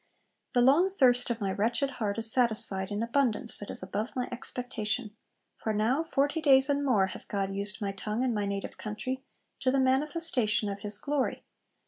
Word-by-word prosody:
'The 245 - +4
long 290 +10 +4
thirst 250 -11 +3
of 235 -1 -2
my 195 -3 -2
wretched 235 +8 0
heart 205 -1 -1
is 225 0 +1
satisfied, 215 -6 +2
in 205 +2 -2
abundance 235 -2 +3
that 205 - -7
is - - -6
above 205 +5 -4
my 250 -1 -2
expectation; 235 -3 -4 0.4
for 220 - -2
now, 230 +8 +1
forty 290 0 -1
days 270 -1 +5
and 285 0 0
more 230 -9 +3
hath 190 - -9
God 195 -1 -2
used 200 +1 -1
my 200 - -1
tongue 210 +4 -3
in 255 -2 0
my 205 -2 -2
native 200 0 -5
country 255 +5 -5 0.4
to 260 - 0
the 270 +1 +2
manifestation 260 -5 +2
of 200 0 -5
His 205 0 +3
glory. 285 +3 -2
235 Hz, 185 wpm, -29 LUFS, 210-265 Hz, 0.4 s, days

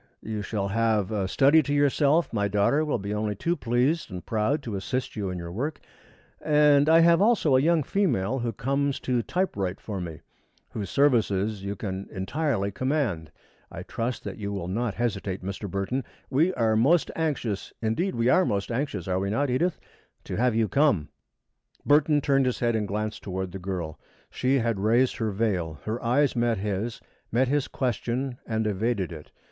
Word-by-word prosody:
You 110 -1 -4
shall 100 -1 -2
have 110 -1 +1
a 100 -3 -1
study 140 +9 +5
to 145 -1 -4
yourself, 145 +2 +2
my 100 -2 +1
daughter 105 +9 +2
will 150 -4 0
be 100 0 -4
only 105 0 -1
too 170 - 0
pleased 125 +5 0
and 90 -2 -7
proud 115 +7 0
to 115 -5 -4
assist 125 +7 -3
you 100 -3 -2
in 90 - -4
your 85 -1 -6
work, 140 - -3 0.6
and 150 -1 +5
I 165 +1 +7
have 170 +1 +5
also 205 - +4
a 130 - +5
young 165 +1 +3
female 135 - 0
who 120 -1 -1
comes 140 +5 -1
to 125 -2 0
type 185 +10 -1
write 95 -2 -2
for 100 -4 -5
me, 85 -3 -7 0.5
whose 105 -3 -5
services 110 -7 +2
you 100 +1 -3
can 95 -1 -5
entirely 100 +1 -1
command. 115 - -1 0.4
I - - -7
trust 120 +2 -3
that - - -6
you 100 -1 -3
will 95 -3 -4
not 110 +3 -2
hesitate, 100 -5 -2
Mr. 100 +1 -5
Burton. 100 +8 -2 0.3
We 160 +8 +3
are 110 -2 +2
most 145 +10 +3
anxious 135 -11 -2
indeed 115 - -1
we 115 0 +1
are 155 +9 +5
most 100 - -1
anxious, 115 - -2
are 95 0 0
we 100 +1 -1
not, 135 +6 0
Edith? 165 +7 0 0.4
to - - -5
have 125 0 +2
you 115 -1 +2
come." 100 - +2 0.8
Burton 145 0 +4
turned 135 -1 +2
his 125 - 0
head 120 -1 +1
and 105 -2 -1
glanced 105 +2 -3
toward 95 -1 -4
the 95 - -6
girl. 90 -4 -4 0.3
She 130 +2 +1
had 115 -4 0
raised 115 +5 +2
her 110 -2 -1
veil. 95 -7 -1
Her 110 +3 -4
eyes 135 +5 +2
met 120 -1 +1
his, 105 +3 -3 0.3
met 125 +3 +2
his 145 -1 +1
question 125 0 -2
and 110 -1 -1
evaded 105 -2 -1
it. 75 -2 -9
115 Hz, 185 wpm, -26 LUFS, 100-140 Hz, 0.8 s, I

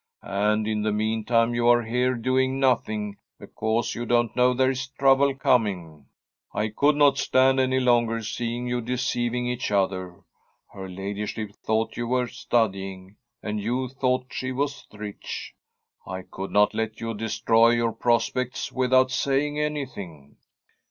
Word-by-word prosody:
And 105 +2 0
in 110 -1 -1
the 105 0 0
meantime 110 +2 +1
you 120 0 +1
are 120 0 +5
here 125 +3 0
doing 130 +3 0
nothing, 110 -6 0 0.2
because 115 +1 -2
you 120 - -4
don't 120 -1 +1
know 125 0 +4
there 130 +1 +3
is 130 0 -4
trouble 135 0 +3
coming. 90 - 0 0.5
I 105 +1 0
could 145 +7 +2
not 145 -1 +4
stand 130 +1 +3
any 130 0 +2
longer 120 -2 +2
seeing 120 +2 -3
you 125 0 -1
deceiving 120 0 -1
each 125 0 -2
other. 95 -3 -1 0.5
Her 95 -1 -7
ladyship 100 +3 -5
thought 110 +2 -2
you 120 -1 -2
were 125 +1 +1
studying, 95 -5 -2 0.3
and 105 0 -2
you 125 +4 -1
thought 130 -1 -1
she 130 0 -3
was 140 +2 -3
rich. 105 -1 -7 0.5
I 95 0 -6
could 95 +1 -7
not 105 0 +3
let 110 0 -3
you 115 0 -3
destroy 115 +1 +3
your 120 -1 +2
prospects 120 +2 0
without 130 0 +3
saying 140 +3 0
anything.' 100 - -5
120 Hz, 145 wpm, -25 LUFS, 105-130 Hz, 0.5 s, are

